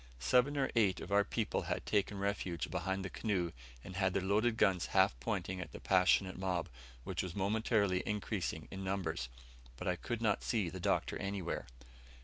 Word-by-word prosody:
Seven 125 - +3
or 135 -1 +1
eight 100 -5 +3
of - - -7
our 100 0 +5
people 110 +1 -1
had - - -3
taken 105 -1 +1
refuge 100 -3 -2
behind 95 +1 -1
the - - -3
canoe, 95 -6 0 0.3
and 90 - -8
had 95 -1 +2
their 95 - +1
loaded 110 +4 +2
guns 95 -4 +3
half - - +6
pointing 90 +9 -2
at - - -8
the - - -7
passionate 95 0 +3
mob, 90 -3 -1 0.3
which - - -2
was 90 -3 -5
momentarily 100 -1 +2
increasing 100 -6 -2
in 95 0 -5
numbers, 90 -8 -2 0.5
but 90 - -5
I 90 - +2
could 120 +6 -4
not 110 -3 +2
see 105 -7 +1
the 95 - -6
Doctor - - 0
anywhere. 95 -3 -3
95 Hz, 180 wpm, -35 LUFS, 90-105 Hz, 0.5 s, half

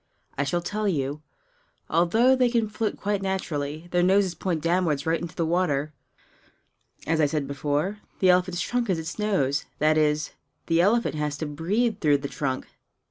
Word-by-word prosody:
I 140 - 0
shall 175 +5 -1
tell 210 +3 -2
you. 145 -4 -1 0.7
Although 220 +10 +4
they 250 -1 +3
can 230 -2 +1
float 215 0 -2
quite 205 0 -1
naturally, 165 -5 -3
their 175 - +2
noses 190 0 +3
point 170 -3 -2
downward 165 -5 +1
right 160 0 +1
into 170 -1 -6
the 165 - 0
water. 155 -4 0 1.1
As 160 0 +1
I 150 - +4
said 150 -1 -1
before, 145 +8 -1 0.2
the 185 -1 +5
elephant's 180 0 +1
trunk 245 0 -1
is 185 - +2
its 160 +5 -6
nose 150 -10 +1
that 155 +1 +3
is, 150 0 +1 0.3
the 165 0 +3
elephant 230 +6 +2
has 150 -1 -2
to 155 - -3
breathe 195 +10 -1
through 150 -5 +3
the 140 0 -5
trunk. 135 -2 -3
170 Hz, 175 wpm, -25 LUFS, 150-195 Hz, 1.1 s, the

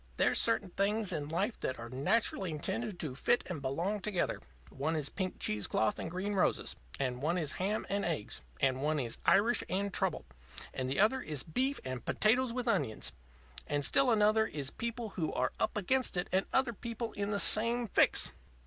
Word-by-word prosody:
There's - - +4
certain 215 -5 +3
things 205 +1 0
in 150 -2 -3
life 195 +8 -1
that 130 - -3
are 115 - -7
naturally 185 - +1
intended 185 +6 -3
to 150 -5 -3
fit 240 - +2
and 165 -6 -4
belong 170 +10 -1
together. 200 -3 -1 0.3
One 155 +4 -2
is 150 -3 0
pink 185 -1 -3
cheese 105 -1 0
cloth 110 -1 +1
and - - -4
green 185 +4 -3
roses, 190 - +1 0.2
and 125 -2 -2
one 165 +5 +1
is 155 -4 -1
ham 205 +4 -1
and 200 0 0
eggs, 130 - -2 0.2
and 130 -1 +1
one 150 +1 +1
is 120 -4 -3
Irish 225 +4 +4
and 195 +1 -1
trouble. - - 0 0.5
And 130 0 -2
the 135 - -1
other 220 +6 +4
one 260 - -8
is 150 -4 -1
beef 260 - +1
and 130 -1 -4
potatoes 245 +3 +2
with 250 0 -3
onions. 110 - 0 0.6
And 145 -1 0
still 275 - +3
another 220 -1 +4
one - - -7
is 140 -3 -2
people 235 -1 -4
who 165 -5 -2
are - - 0
up - - 0
against 255 +1 +1
it 180 - -1
and 190 +1 +2
other 265 -3 +2
people 230 +1 -5
in 200 0 -1
the 205 -1 0
same 230 +3 +4
fix." - - +4
190 Hz, 200 wpm, -32 LUFS, 145-225 Hz, 0.6 s, There's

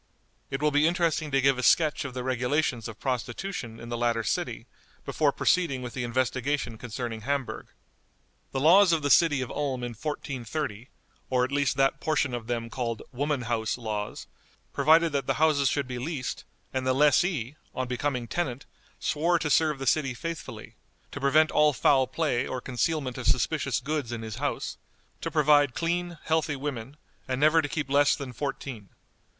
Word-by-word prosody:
It 135 +1 -3
will 150 - +3
be 145 +2 +4
interesting 165 -3 +1
to 135 -1 +2
give 135 -1 +3
a - - 0
sketch 150 +3 +3
of 130 -2 -6
the 125 - -3
regulations 130 0 0
of 115 -1 -9
prostitution 125 -1 -4
in 115 - -9
the 120 - -2
latter 115 -1 +1
city - - -2 0.4
before - - +2
proceeding 145 -8 +1
with 120 - -6
the 125 - -3
investigation 130 0 -1
concerning 120 -1 -5
Hamburg. 140 +2 -3 0.8
The 135 - -2
laws 175 +5 +6
of 160 -2 +1
the 145 - +1
city 145 -2 +5
of 125 - -4
Ulm 135 -4 -2
in 120 - -3
1430, 130 -2 -4 0.4
or 125 -1 +2
at 130 - -1
least 145 0 +1
that 135 0 +2
portion 145 -4 0
of 120 -2 -4
them 120 -1 -2
called 115 -3 -3
"woman 140 0 -1
house" 115 -1 -1
laws, 105 -3 -4 0.5
provided 165 +1 +4
that 140 -1 -1
the - - +1
houses 150 -3 +3
should 140 -3 -1
be 125 -1 -5
leased, 135 -1 -4 0.3
and 130 -1 -1
the 130 - +3
lessee, 145 - +2 0.2
on 130 0 -2
becoming 125 -1 -2
tenant, 135 -3 -3 0.3
swore 170 +3 +1
to 155 -2 -2
serve 155 -1 +3
the 135 - -5
city 135 -1 +1
faithfully; 165 +5 -7 0.3
to 140 - -7
prevent 155 +3 +4
all 150 -1 +4
foul 130 +2 +3
play 130 -2 0
or 130 - -3
concealment 130 +1 -2
of 125 - -3
suspicious 135 0 +1
goods 140 -2 -3
in 115 -1 -4
his 110 0 -6
house; 145 +2 -3 0.4
to - - -2
provide 145 -3 +4
clean, 175 0 -1
healthy 160 -2 0
women, 135 -1 -5 0.3
and 130 -1 -2
never 155 +2 +5
to 145 - -4
keep 150 0 -2
less 145 +1 +4
than 135 -4 -7
fourteen. 130 -6 -5
135 Hz, 180 wpm, -27 LUFS, 125-150 Hz, 0.8 s, laws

